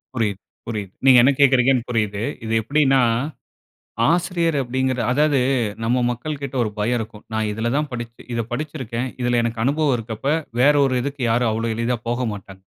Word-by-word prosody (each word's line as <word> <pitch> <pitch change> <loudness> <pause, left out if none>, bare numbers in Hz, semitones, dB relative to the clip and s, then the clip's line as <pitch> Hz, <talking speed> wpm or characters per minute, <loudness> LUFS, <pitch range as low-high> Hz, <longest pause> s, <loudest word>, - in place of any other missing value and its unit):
புரியுது, 105 -5 -1 0.3
புரியுது. 105 -5 -4
நீங்க 130 -2 +8
என்ன 140 - +5
கேக்குறீங்கனு, 130 -2 +4
புரியுது. 105 -3 -1 0.2
இது 110 - -2
எப்டினா, 135 +2 +3 1.1
ஆசிரியர் 170 -2 +1
அப்டிங்கற 130 0 -1
அதாவது 145 +1 +3 0.4
நம்ம 125 +2 +1
மக்கள் 145 +5 -5
கிட்ட, 135 -1 -5
ஒரு 110 - -2
பயம் 120 +4 +1
இருக்கும். 110 -1 -8
நான் 110 0 0
இதில 110 +3 -2
தான் 150 0 -1
படிச் 120 -1 -5 0.2
இத 115 - 0
படுச்சுருக்கேன். 130 -3 -3
இதில 120 -1 +2
எனக்கு 115 -1 -2
அனுபவம் 145 0 +2
இருக்கப்ப, 115 +1 -7 0.3
வேற 145 +4 +6
ஒரு 130 -1 0
இதுக்கு, 140 +1 -5
யாரும் 115 0 +2
அவ்வளோ 115 +1 -1
எளிதா 115 +2 -1
போகமாட்டாங்க. 105 -6 -4
120 Hz, 160 wpm, -21 LUFS, 115-135 Hz, 1.1 s, நீங்க